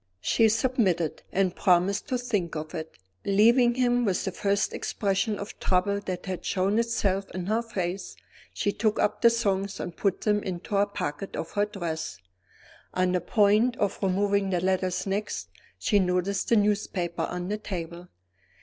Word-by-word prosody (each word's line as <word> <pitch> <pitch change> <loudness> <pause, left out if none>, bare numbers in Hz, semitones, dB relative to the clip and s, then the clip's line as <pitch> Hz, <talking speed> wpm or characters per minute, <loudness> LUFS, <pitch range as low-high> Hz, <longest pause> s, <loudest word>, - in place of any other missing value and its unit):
She 225 - +3
submitted, 215 - +1
and 185 -1 +1
promised 185 +3 +2
to 255 -3 0
think 210 -10 -2
of 155 0 -5
it. 160 -1 -6 0.3
Leaving 235 +5 +4
him, 245 -1 +2
with 195 -5 0
the 190 - -1
first 200 +2 0
expression 200 +1 -1
of 200 +1 -8
trouble 195 +2 +1
that 185 -3 -5
had 185 -2 -4
shown 195 +3 +1
itself 200 -4 0
in 185 -1 -3
her 220 +4 +1
face, 195 -5 -4 0.4
she 205 - -1
took 215 +1 0
up - - +1
the 235 - +8
songs 200 -4 -1
and 175 - -5
put 195 -3 0
them 210 -1 +2
into 180 -1 -6
the 200 0 +3
pocket 170 -2 -4
of 165 - -4
her 205 0 +1
dress. 160 - -4 0.8
On 185 0 +2
the 180 -1 +1
point 215 +6 +3
of 200 -1 -1
removing 200 +1 +1
the 180 -2 +1
letters 185 0 0
next, 205 +2 -3 0.3
she 205 - +2
noticed 180 +1 0
the 235 - +5
newspaper 200 -5 0
on 180 +1 -4
the 210 +1 -2
table. 175 -3 -6
195 Hz, 165 wpm, -27 LUFS, 180-210 Hz, 0.8 s, the